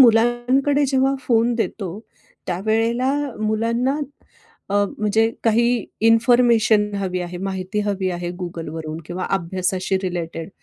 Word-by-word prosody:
मुलांकडे 245 +4 +4
जेव्हा 265 0 +2
फोन 235 -2 +2
देतो 205 -4 -3 0.5
त्यावेळेला 225 +7 +1 0.3
मुलांना 230 +6 0 0.7
अ, - - -1 0.2
म्हणजे 220 +2 +2
काही 235 0 +2 0.2
इन्फॉर्मेशन 230 -3 +4
हवी 185 -2 -2
आहे, 175 0 -5
माहिती 190 +1 -3
हवी 195 -2 -1
आहे 175 0 -4
Googleवरून 160 -2 -5
किंवा 180 +1 -4
अभ्यासाशी 185 +1 -1
रिलेटेड 170 -3 -4
215 Hz, 105 wpm, -21 LUFS, 185-235 Hz, 0.7 s, मुलांकडे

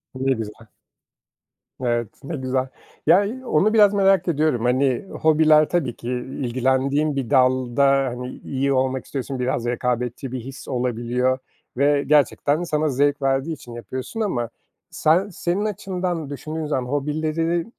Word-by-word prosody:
Ne 135 +1 +1
güzel. 110 0 -7 1.2
Evet, 120 -2 0 0.2
ne 160 +3 -4
güzel. 130 0 -1 0.4
Ya, 180 +5 +6
iyi. 260 +5 -6
Onu 215 +6 +2
biraz 205 -2 +6
merak 195 -2 +3
ediyorum. 150 -7 +1
Hani, 130 +5 +1 0.2
hobiler 155 -1 +5
tabii 145 -9 0
ki 120 - -9
ilgilendiğin 130 +3 0
bir 135 -4 -2
dalda, 130 0 +3
hani, 130 -2 0
iyi 140 0 0
olmak 130 0 0
istiyorsun. 135 -1 -4
Biraz 125 -1 -1
rekabetçi 125 +1 -2
bir 130 - -3
his 135 +3 -9
olabiliyor 125 0 0 0.4
ve 145 +1 +3
gerçekten 150 +2 +2
sana 155 -2 0
zevk 145 +2 +1
verdiği 135 +4 0
için 120 -5 -10
yapıyorsun 130 - -6
ama 120 - -1 0.4
sen 180 +6 +2
senin 180 +3 -2
açından 180 -6 -3
düşündüğün 155 +2 -5
zaman 130 -3 -2
hobileri, 155 +3 -1
135 Hz, 140 wpm, -22 LUFS, 125-155 Hz, 1.2 s, Ya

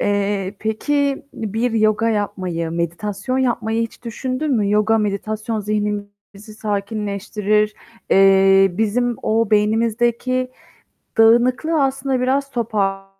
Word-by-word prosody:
Eee, 200 -1 -1
peki, 280 +6 -1
bir 225 +3 -2
yoga 215 0 +2
yapmayı, 185 -6 -2
meditasyon 195 +9 -3
yapmayı 230 -3 0
hiç 230 +1 -7
düşündün 255 +5 -3
mü? 210 -5 +1
Yoga, 210 +1 +3
meditasyon 215 +2 -2
zihnimizi 205 0 -5
sakinleştirir. 210 0 -1 0.4
Eee, 195 0 +5
bizim 235 +2 0
o 225 0 +1
beynimizdeki 235 +4 +1 0.7
dağınıklığı 250 +7 +4
aslında 270 -1 -1
biraz 275 +2 0
topar 200 -5 -1
215 Hz, 100 wpm, -20 LUFS, 205-240 Hz, 0.7 s, Eee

